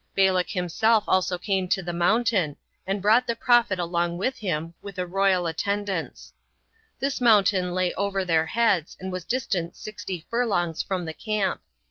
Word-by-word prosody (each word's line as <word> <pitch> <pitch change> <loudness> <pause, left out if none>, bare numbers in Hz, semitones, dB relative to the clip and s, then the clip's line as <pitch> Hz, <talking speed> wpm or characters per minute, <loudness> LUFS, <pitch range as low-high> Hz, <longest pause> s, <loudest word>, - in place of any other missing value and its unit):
Balak 190 -2 +3
himself 205 +5 +2
also 185 -1 +2
came 190 0 -1
to 190 0 0
the 175 0 -4
mountain, 185 -3 +2 0.3
and 195 0 -2
brought 225 +5 +4
the 235 - 0
prophet 240 -4 +3
along 170 0 -1
with 255 +8 -2
him, 165 -5 -3
with 200 -2 -9
a 180 - -1
royal 185 0 +2
attendance. 195 +2 -3 0.7
This 275 -1 -2
mountain 195 -6 +4
lay 185 -1 +1
over 195 -1 -1
their 160 -2 +2
heads, 210 -6 +1
and 190 0 -5
was 185 -2 -5
distant 195 -9 -2
sixty 190 -5 -7
furlongs 195 -9 0
from 185 -3 -3
the 160 - -5
camp. 215 +2 -2
190 Hz, 160 wpm, -25 LUFS, 175-215 Hz, 0.7 s, brought